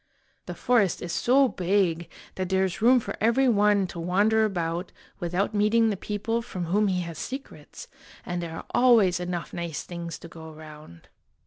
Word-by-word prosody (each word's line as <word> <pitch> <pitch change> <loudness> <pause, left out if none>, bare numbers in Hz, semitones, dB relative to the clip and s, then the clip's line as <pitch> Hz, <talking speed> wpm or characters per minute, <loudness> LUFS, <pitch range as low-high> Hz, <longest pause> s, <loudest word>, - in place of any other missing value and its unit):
The - - -5
forest 225 -7 +1
is 175 - -4
so 265 +2 +4
big 180 -5 0 0.2
that 185 -1 -4
there 190 0 +2
is 185 +2 -5
room 250 +3 +6
for - - -6
every 235 +5 +3
one 205 -3 +3
to 175 -1 -7
wander 205 +6 +2
about 175 -3 -3 0.3
without 180 +5 -1
meeting 215 +2 +3
the - - -1
people 210 +4 -2
from 185 -6 -5
whom 205 +5 +2
he 185 -2 0
has 170 -2 -7
secrets, 270 - -8 0.4
and 175 -1 -3
there 165 -1 -6
are - - -8
always 220 -8 +4
enough 175 -1 -4
nice 170 -3 -4
things 170 -2 -7
to - - -11
go 160 -1 -11
around. 155 - -13
185 Hz, 180 wpm, -26 LUFS, 170-220 Hz, 0.4 s, room